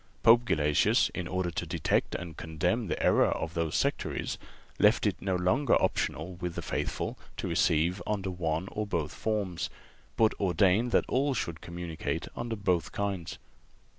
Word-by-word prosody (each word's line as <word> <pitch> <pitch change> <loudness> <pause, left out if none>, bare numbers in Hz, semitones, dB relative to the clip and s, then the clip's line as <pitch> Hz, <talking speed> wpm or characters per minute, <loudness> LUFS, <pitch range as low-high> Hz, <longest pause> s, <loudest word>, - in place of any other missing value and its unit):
Pope 120 +1 +7
Gelasius, 75 -8 +3
in 90 - -3
order 90 -1 -1
to 85 - -3
detect 85 -2 0
and 85 -3 -6
condemn 80 +9 -1
the - - -2
error - - +5
of 80 - -2
those 85 -2 -1
sectaries, - - -1 0.4
left - - +4
it - - 0
no 95 -1 0
longer 110 +11 +3
optional 85 +4 -1
with 90 -1 -4
the - - -4
faithful - - -3 0.2
to - - -3
receive 85 +4 +2
under 100 -3 -1
one 85 0 -2
or 105 0 -3
both 80 -6 -2
forms, 105 -6 -2 0.5
but 110 -1 +4
ordained 95 +5 +3
that - - +3
all 135 +1 +1
should 85 -7 -3
communicate 85 -2 -4
under 120 -1 -3
both 90 -5 0
kinds. 100 -5 -3
90 Hz, 160 wpm, -29 LUFS, 85-105 Hz, 0.5 s, Pope